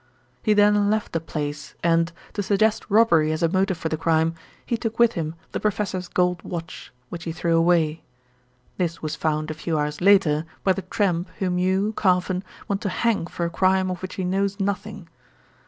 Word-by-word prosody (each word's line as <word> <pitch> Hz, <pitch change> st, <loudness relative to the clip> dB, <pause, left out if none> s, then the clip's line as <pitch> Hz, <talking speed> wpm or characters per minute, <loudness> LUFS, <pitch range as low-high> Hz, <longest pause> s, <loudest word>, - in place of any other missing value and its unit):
He 215 Hz, -, +3 dB
then 205 Hz, 0 st, +4 dB
left 215 Hz, 0 st, 0 dB
the 165 Hz, -, +1 dB
place 150 Hz, -2 st, -5 dB
and, 165 Hz, 0 st, +3 dB, 0.2 s
to 205 Hz, -, -2 dB
suggest 210 Hz, +3 st, +1 dB
robbery 185 Hz, -8 st, +4 dB
as 155 Hz, +2 st, -2 dB
a -, -, +5 dB
motive 190 Hz, +1 st, +1 dB
for 165 Hz, -, -3 dB
the 160 Hz, -, -2 dB
crime, 160 Hz, 0 st, +2 dB, 0.3 s
he 235 Hz, -, 0 dB
took 230 Hz, -1 st, -4 dB
with 235 Hz, -1 st, +5 dB
him 160 Hz, -1 st, -3 dB, 0.2 s
the -, -, -2 dB
professor's 195 Hz, -3 st, -1 dB
gold 180 Hz, -1 st, +1 dB
watch, 165 Hz, -2 st, -7 dB, 0.2 s
which 170 Hz, -1 st, -7 dB
he 165 Hz, -, -2 dB
threw 165 Hz, +1 st, 0 dB
away. 165 Hz, -2 st, +2 dB, 0.8 s
This 170 Hz, -3 st, -2 dB
was 155 Hz, -, -2 dB
found 155 Hz, 0 st, -1 dB
a -, -, -3 dB
few 155 Hz, +1 st, -2 dB
hours 150 Hz, +1 st, -2 dB
later 175 Hz, -6 st, +4 dB, 0.2 s
by 190 Hz, -, +4 dB
the 195 Hz, -, -4 dB
tramp 185 Hz, -1 st, -1 dB
whom 180 Hz, -2 st, 0 dB
you, 190 Hz, +4 st, +1 dB
Carfon, 185 Hz, -2 st, +1 dB, 0.3 s
want 200 Hz, -1 st, -1 dB
to 205 Hz, -, -1 dB
hang 210 Hz, -2 st, 0 dB
for 175 Hz, -, -3 dB
a 170 Hz, -, -3 dB
crime 185 Hz, +1 st, +2 dB
of 180 Hz, -, -5 dB
which 185 Hz, 0 st, -6 dB
he 190 Hz, -, -3 dB
knows 195 Hz, +2 st, 0 dB
nothing." 200 Hz, -2 st, -3 dB
180 Hz, 195 wpm, -24 LUFS, 165-200 Hz, 0.8 s, a